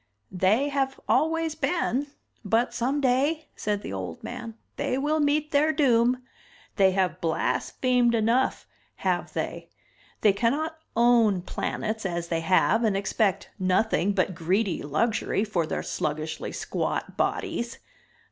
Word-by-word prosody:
"They 205 +10 +2
have 270 -1 -1
always 325 0 +2
been. 290 -5 0 0.4
But 225 +4 +1
someday," 275 +4 +1
said 205 -1 -2
the - - -5
old 90 -4 -6
man, 230 -2 -6 0.2
"they 255 - -1
will 300 +3 +1
meet 300 +1 +1
their 295 +2 +4
doom. 250 -4 +3 0.5
They 190 -2 +5
have 185 -1 0
blasphemed 240 +9 +1
enough, 230 +4 +1 0.4
have - - 0
they. - - -4 0.5
They 210 -2 +5
cannot 295 +10 0 0.2
own 230 -6 +4
planets 220 +3 -3
as 170 -3 -3
they 165 - 0
have 190 +6 +3
and 210 -3 +2
expect 200 0 0
nothing 190 +1 +2
but 185 -1 +1
greedy 185 +4 0
luxury 205 +7 0
for 180 -7 -1
their - - -3
sluggishly 155 +1 -3
squat - - -3
bodies. 235 0 -2
225 Hz, 130 wpm, -26 LUFS, 190-270 Hz, 0.5 s, They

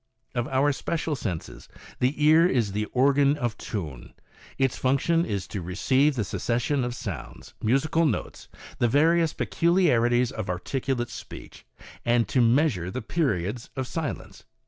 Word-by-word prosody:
Of 120 -1 -1
our 135 +2 +2
special 160 +2 -2
senses, 90 - -6 0.3
the 140 +4 +1
ear 160 +3 +6
is 120 - +1
the 105 +2 -1
organ 140 +4 +3
of 120 -5 -2
tune. 75 - -6 0.4
Its 135 -3 +1
function 150 +6 +1
is 100 -3 -3
to 100 - -4
receive 130 - +1
the 115 - 0
succession 120 +7 -1
of 120 0 -3
sounds, 90 - -7
musical 155 +8 +2
notes, 120 - -4 0.3
the 120 - +3
various, 160 +5 +3
peculiarities 125 -9 +2
of 110 -4 -5
articulate 120 +7 -2
speech, - - -10 0.4
and 120 -2 +2
to 125 - +2
measure 115 - +2
the 125 +5 -5
periods 110 - -1
of 130 - -2
silence. 160 +3 -5
125 Hz, 145 wpm, -26 LUFS, 110-145 Hz, 0.4 s, ear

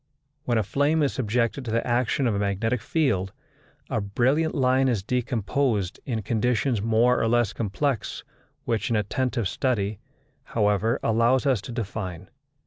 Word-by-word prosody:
When 120 -2 +1
a 110 - +2
flame 145 +8 +1
is 140 - +1
subjected 120 +1 0
to 120 - -6
the 115 +1 0
action 125 +3 +1
of 115 - +2
a 100 - -1
magnetic 105 +4 0
field, 110 - 0 0.6
a 110 - -1
brilliant 130 +10 +1
line 130 -1 +3
is 115 -7 0
decomposed 115 -3 -1
in 115 -4 -2
conditions 115 +2 0
more 115 +3 +3
or - - +2
less 120 -2 +2
complex 115 +3 -2 0.4
which 115 -4 -1
an 115 - +1
attentive 115 +2 0
study, 105 -3 -1 0.5
however, 105 +2 +1
allows 115 +4 +3
us 130 -7 +2
to 105 - -8
define. 100 -5 -5
115 Hz, 150 wpm, -25 LUFS, 105-130 Hz, 0.6 s, line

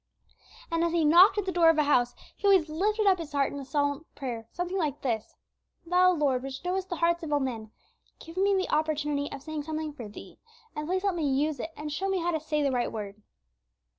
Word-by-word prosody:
And, 330 0 +1
as 340 0 0
he 335 -2 +2
knocked 350 +8 +7
at 410 - 0
the 380 - -1
door 340 -2 +5
of 325 - +3
a 305 - +4
house, 245 -4 +2 0.2
he 405 - -1
always 380 -5 +5
lifted 420 +7 0
up 380 -2 +4
his 310 -3 -7
heart 280 -1 +1
in 285 - -5
a - - -6
silent 285 +2 -1
prayer, 235 -5 -5
something 360 +2 -3
like 300 -5 -2
this: 225 -5 -2 0.5
"Thou, 365 +1 +4
Lord, 280 -6 +1
which 270 +4 -7
knowest 370 +1 -2
the 350 - -2
hearts 340 +1 +1
of 320 -2 -5
all 290 - +3
men, 235 -5 -4 0.5
give 330 +1 -12
me 395 +1 +3
the 375 -1 -1
opportunity 295 -2 -1
of 275 -1 -8
saying 310 -1 -4
something 310 0 -4
for 240 -6 -8
Thee, 205 - -12 0.4
and 300 0 -4
please 370 +2 -1
help 400 -2 +1
me 320 -5 -1
use 285 +1 0
it, 320 - -4
and 300 0 -5
show 390 +5 -2
me 385 - +1
how 350 0 0
to 320 - -1
say 300 -1 -1
the 280 - +2
right 245 -2 0
word." 210 -1 -7
310 Hz, 240 wpm, -28 LUFS, 280-355 Hz, 0.5 s, knocked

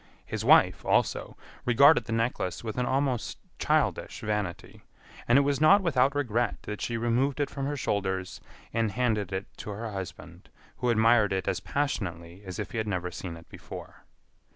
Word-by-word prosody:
His - - -4
wife, - - +5
also, - - 0 0.3
regarded 125 +1 +5
the - - -6
necklace 115 -5 -1
with 115 +2 -4
an 125 - 0
almost 130 -3 -1 0.2
childish - - 0
vanity, 105 -5 -3 0.5
and 120 - +5
it 140 - +5
was 140 0 0
not 195 +6 +6
without 140 -4 +2
regret 120 -4 -1
that 105 -1 -6
she 115 - -2
removed 120 +5 +1
it 145 - -1
from 140 -1 -3
her 145 0 -2
shoulders 95 -6 -2 0.3
and 115 -3 0
handed 110 -5 0
it 95 +1 -3
to - - -7
her 110 +2 -5
husband 90 -2 -8 0.3
who 125 - 0
admired 110 -2 +4
it 95 -1 -1
as - - 0
passionately 90 - -3
as 95 -2 -7
if - - -5
he 115 - -2
had 110 - -2
never 90 -3 -2
seen 85 -1 -6
it 85 - -15
before. - - -10
115 Hz, 175 wpm, -28 LUFS, 95-130 Hz, 0.5 s, not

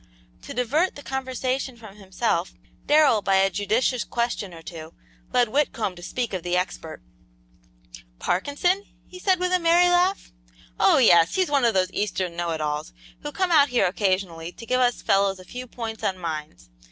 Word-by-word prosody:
To - - -8
divert 290 +9 +1
the 285 - -10
conversation 260 -1 -3
from 215 -3 -13
himself, 190 -2 -2 0.3
Darrell, 290 -7 +5
by 195 -1 +1
a 195 0 +3
judicious 225 +6 0
question 235 -5 -2
or 165 -1 -12
two, 160 -1 -9 0.4
led 245 -2 +3
Whitcomb 230 -7 -1
to 175 - -12
speak 235 +5 -3
of 185 - -2
the 175 +1 -1
expert. 175 - -4 1.1
"Parkinson?" 290 - 0 0.2
he 365 - -12
said 370 -1 +2
with 360 0 0
a 365 - +4
merry 345 +1 +4
laugh. 360 +2 +1 0.5
"Oh, - - +5
yes, 170 -10 +5
he's 370 -5 +1
one 280 -4 +3
of 230 - +2
those 185 -1 +1
eastern 185 -4 -2
know 175 0 -2
it 160 -1 -3
alls 150 0 -3 0.3
who 295 - -5
come 370 +2 -1
out 290 -3 +5
here 245 - +2
occasionally 185 -3 -1
to 230 - -12
give 255 +2 +1
us 245 -1 +1
fellows 195 0 +2
a 185 - -12
few 250 +6 -8
points 225 -2 -7
on 190 - 0
mines. 155 - -6
220 Hz, 180 wpm, -24 LUFS, 180-275 Hz, 1.1 s, Darrell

